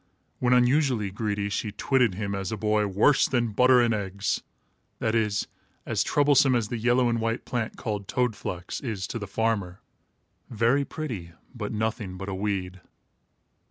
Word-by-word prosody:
When 125 - +1
unusually 125 -4 +3
greedy, 100 0 -2
she 105 +1 -2
twitted 120 -1 +1
him 100 0 -3
as 95 -1 -3
a 110 - -2
boy 105 0 +1
"worse 105 +9 +4
than 120 -3 0
Butter 125 +4 +5
and 120 -1 +2
Eggs"; 100 -1 -2 0.6
that 110 - -1
is, 105 -2 +1 0.4
as - - 0
troublesome 140 -2 +4
as 115 -3 0
the 120 - -3
yellow 120 +2 +3
and 115 -1 0
white 115 +1 -2
plant, 120 -3 -3
called 105 -3 -4
toad 125 -3 0
flax, 90 -3 -5
is 110 -8 -3
to 130 -4 -5
the 105 - -6
farmer 100 -4 -1 0.7
very 120 +5 +2
pretty, 115 - -6 0.2
but 105 -5 -5
nothing 110 -3 -2
but 95 +1 -6
a - - -3
weed. 95 -2 -3
110 Hz, 165 wpm, -26 LUFS, 100-125 Hz, 0.7 s, Butter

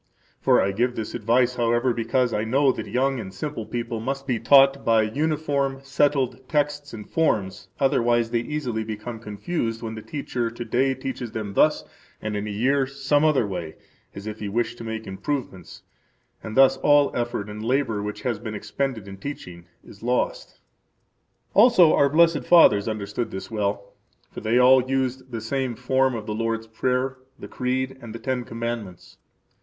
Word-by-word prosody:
For - - +4
[I 100 - +2
give 120 +5 0
this 110 -1 -5
advice, 120 +2 +1
however, 120 +1 +2
because 120 +1 0
I 105 - 0
know 135 +4 +3
that] 110 -3 -6
young 130 +5 0
and 95 - -6
simple 115 +2 -5
people 120 -1 -3
must 135 +4 -3
be 125 -4 -1
taught 135 +3 +5
by 115 -1 +4
uniform, 140 +2 -1
settled 135 -2 0
texts 145 -1 -1
and 105 -2 -9
forms, 100 - 0
otherwise 120 -4 +2
they 120 - +2
easily 120 -3 -3
become 110 +1 -6
confused 115 - -3
when 110 -1 -4
the 110 - -7
teacher 125 -3 -3
to 120 +1 -7
day 130 +3 +1
teaches 130 -3 -5
them 105 -3 -4
thus, - - +3 0.4
and 105 -1 -4
in 105 +1 -3
a - - -4
year 130 +6 +1
some 140 +2 +1
other 150 -7 +3
way, 90 -5 -5 0.4
as 100 - -8
if 110 0 -6
he 105 - -4
wished 120 +3 -2
to - - -7
make 110 -1 -5
improvements, 95 - -5 0.6
and 110 +2 -7
thus 135 0 +6
all 145 +1 +3
effort 120 -4 -2
and 105 +1 -7
labor 115 -3 0
[which 105 0 -5
has 120 -4 -1
been 110 -2 -6
expended 120 -1 -3
in 95 0 -9
teaching] 90 -8 -8 0.2
is 100 - -15
lost. 125 +2 -2 0.9
Also 200 -7 +6
our 140 - +4
blessed 165 0 +4
fathers 110 -13 +6
understood 110 +2 -3
this 95 +4 -7
well; 100 -2 -2 0.4
for - - -8
they 115 +2 +1
all 130 +1 +7
used 130 -1 -1
the 115 -2 -4
same 130 +1 -2
form 130 +1 +1
of 110 -2 -5
the 105 - -3
Lord's 115 0 -2
Prayer, 125 +4 -1 0.2
the - - -9
Creed, 130 +1 -2
and 115 -1 -9
the - - -6
Ten 130 -1 -2
Commandments. 115 -6 -6
120 Hz, 180 wpm, -24 LUFS, 110-135 Hz, 0.9 s, all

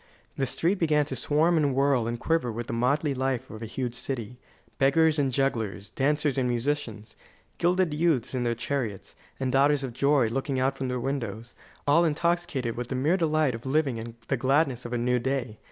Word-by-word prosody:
The 135 - -1
street 175 - 0
began 150 -3 +3
to 135 - -5
swarm 155 +6 +2
and 145 -4 +2
whirl 135 -4 +2
and 120 0 -3
quiver 160 -6 0
with 115 +2 -5
the 115 - -5
motley 140 +5 +1
life 130 -1 -2
of 110 - -9
a 115 - -5
huge 125 +1 -3
city: 125 -2 -4 0.4
beggars 155 +3 +4
and 135 -2 +1
jugglers, 110 -8 -1
dancers 145 +2 +1
and 125 -1 +1
musicians, 120 -3 -3 0.4
gilded 180 -1 +2
youths 150 -6 +1
in 130 - -1
their 120 -1 0
chariots, 120 -5 -4 0.2
and 130 -1 -1
daughters 140 +2 +3
of 130 -3 -4
joy 140 0 +3
looking 135 +3 -2
out 135 +1 +1
from 135 -1 -3
their 125 0 -2
windows, 120 -4 -4 0.3
all 150 +4 +5
intoxicated 165 -6 0
with 120 0 -4
the 130 - -3
mere 145 +7 +2
delight 155 -6 +1
of 115 +1 -7
living 135 -3 0
and 115 0 -7
the 135 - 0
gladness 135 -1 +1
of 120 - -5
a - - +1
new 125 +1 +1
day. 125 -3 -2
135 Hz, 200 wpm, -27 LUFS, 120-150 Hz, 0.4 s, all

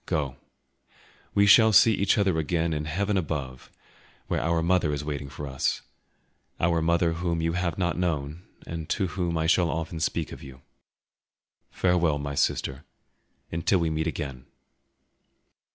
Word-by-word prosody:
Go; 75 -7 -1 1.0
we 100 - +5
shall 110 +2 +7
see 110 +2 +6
each 100 +1 +2
other 95 -5 +2
again 80 +1 0
in 75 0 -3
heaven 100 +6 -1
above, 70 -7 -4 0.6
where - - -1
our 80 +1 +1
mother 85 -3 +2
is 75 0 -4
waiting 70 -2 -4
for 75 +1 -7
us—our 80 +4 -4
mother 85 +1 +2
whom 85 0 -2
you 80 0 0
have 90 -1 -1
not 90 -2 -1
known, 80 -2 -2 0.2
and 80 -2 -6
to 95 -4 0
whom 85 -1 -2
I 80 - 0
shall 85 0 +3
often 80 0 -3
speak 80 - -1
of - - -9
you. 65 0 -12 1.1
Farewell, 85 -4 +1
my 70 0 -4
sister, 70 0 -1 0.7
until 85 +4 +1
we 85 -2 0
meet 80 +1 -1
again!" 70 -4 -5
80 Hz, 150 wpm, -26 LUFS, 75-90 Hz, 1.1 s, shall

